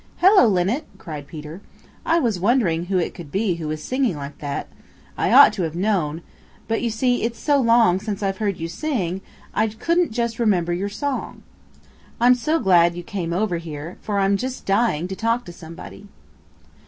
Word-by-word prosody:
"Hello, 380 - +6
Linnet!" 205 - +1
cried 150 -3 -8
Peter. 155 +4 -9 0.5
"I 330 - +4
was 230 - 0
wondering 185 -6 +2
who 190 +1 0
it 175 - -1
could 165 -5 -10
be 195 -2 0
who 160 -2 -5
was 155 0 -4
singing 255 - 0
like 140 0 -8
that. 145 -1 -4 0.5
I - - 0
ought - - +8
to - - -3
have 165 -2 -2
known, 170 -5 -1 0.4
but 225 0 -1
you 235 - 0
see 245 +2 0
it's 230 +1 -2
so 290 -2 +2
long 230 -6 +4
since 210 -1 -4
I've 195 -1 -1
heard 205 -4 -1
you 165 - -4
sing 190 - -2
that - - -26 0.3
I 215 +1 +2
couldn't 335 +10 0
just 235 0 -2
remember 180 -7 +2
your 195 +4 -2
song. 280 +6 -4 0.8
I'm 245 +2 +6
so 305 +6 0
glad 175 - +4
you 175 - -6
came 175 -2 -4
over 180 0 0
here 160 0 -8
for 205 -2 -2
I'm 195 0 +2
just 255 +4 -5
dying 195 -5 +1
to 190 - -5
talk 230 +4 0
to 175 - -9
somebody." 170 +4 -11
195 Hz, 190 wpm, -22 LUFS, 170-235 Hz, 0.8 s, ought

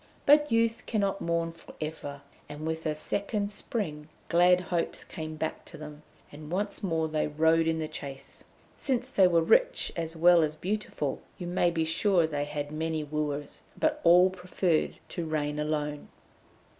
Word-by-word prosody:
But 295 +1 +5
youth 230 0 +1
cannot 200 -3 0
mourn 170 0 0
for 165 0 -15
ever, 145 -2 -6 0.3
and 150 +1 -7
with 160 0 -2
a 155 - 0
second 200 +6 -2
spring, 160 -8 -3 0.2
glad 180 +1 +5
hopes 175 -2 -2
came 155 -1 -6
back 155 0 -3
to 165 - -11
them, 150 0 -9 0.3
and 150 +1 -10
once 200 +3 -2
more 165 -4 0
they 155 -1 0
rode 160 +2 +3
in 165 0 +1
the 160 -1 -2
chase. 135 -2 -8 0.3
Since 260 -1 -1
they 190 -6 +5
were 170 -2 +3
rich - - +3
as 165 -1 -3
well 170 +1 +6
as 155 -1 0
beautiful 180 -6 -3 0.2
you 180 - -6
may 175 0 +2
be 165 -1 0
sure 175 +2 +2
they 145 -2 -2
had 145 0 -4
many 160 0 -2
wooers, 150 -1 -3 0.2
but 305 -1 +1
all 180 +2 +7
preferred 180 -2 0
to 170 -2 -4
reign 150 -1 -1
alone. 150 -1 -2
165 Hz, 170 wpm, -29 LUFS, 150-185 Hz, 0.3 s, all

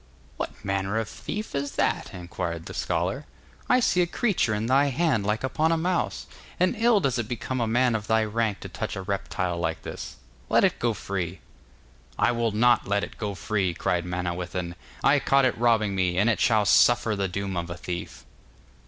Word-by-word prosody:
'What - - -6
manner 95 +2 -1
of 110 -1 -1
thief 215 +1 -6
is 140 0 -2
that?' - - 0
inquired 85 -2 -5
the - - -7
scholar. - - -2 0.4
'I 250 - +5
see 180 -6 +3
a 175 - +2
creature 190 - +1
in 105 +2 -2
thy 135 +4 +4
hand 140 -7 +1
like 105 +3 0
upon 155 +5 +1
a 165 - +2
mouse, 175 +2 -1 0.3
and 185 +5 +2
ill 230 -1 +4
does 130 -8 0
it 115 - -2
become 125 +1 -3
a 115 - +1
man 120 +2 +3
of 110 -1 -2
thy 110 0 +3
rank 110 -1 -1
to - - -6
touch - - -4
a 95 - -5
reptile 90 -3 -2
like 80 -1 -2
this. - - -7 0.3
Let - - +4
it - - +2
go 115 -2 +1
free.' 95 -2 -4 0.8
'I - - +3
will 115 -1 0
not 120 +2 +3
let 100 0 +1
it - - -7
go 105 -2 -3
free,' 95 -1 -1
cried 85 0 0
Manawyddan. 90 0 -3 0.3
'I 145 +1 +5
caught 135 0 +3
it 125 - +2
robbing 110 -3 +2
me, 90 -2 0
and 105 +5 +4
it 110 - -1
shall 110 -3 +3
suffer 120 0 +4
the 100 -1 0
doom 95 +1 -3
of 85 0 -3
a 85 - -5
thief. 85 0 -6
110 Hz, 200 wpm, -26 LUFS, 95-130 Hz, 0.8 s, I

